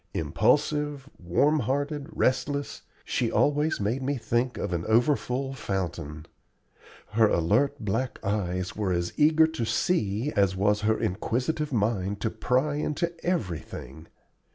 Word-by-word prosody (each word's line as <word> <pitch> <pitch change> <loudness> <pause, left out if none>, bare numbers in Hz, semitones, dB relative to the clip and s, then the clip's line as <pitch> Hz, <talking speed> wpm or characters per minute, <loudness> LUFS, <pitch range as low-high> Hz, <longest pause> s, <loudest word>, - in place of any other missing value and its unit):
Impulsive, 140 - +1
warm 140 - +2
hearted, 145 +3 -2
restless, 140 +2 -1 0.2
she 120 -2 0
always 150 +2 +2
made 110 +6 -1
me 140 +1 -1
think 120 +1 -1
of 95 - -3
an 85 -1 -1
overfull 130 +3 +1
fountain. 85 - -4 0.9
Her 110 0 +4
alert 105 +13 +2
black 110 +5 -2
eyes 90 -3 -1
were 105 -3 -1
as 85 0 -1
eager 160 +1 +5
to 160 -6 -3
see 115 - 0
as 100 -2 +3
was 105 +2 +2
her 110 +1 +1
inquisitive 125 - -1
mind 100 -4 0
to 110 - 0
pry 130 +6 0
into 150 +3 -1
everything. 85 - -4
115 Hz, 130 wpm, -27 LUFS, 95-145 Hz, 0.9 s, eager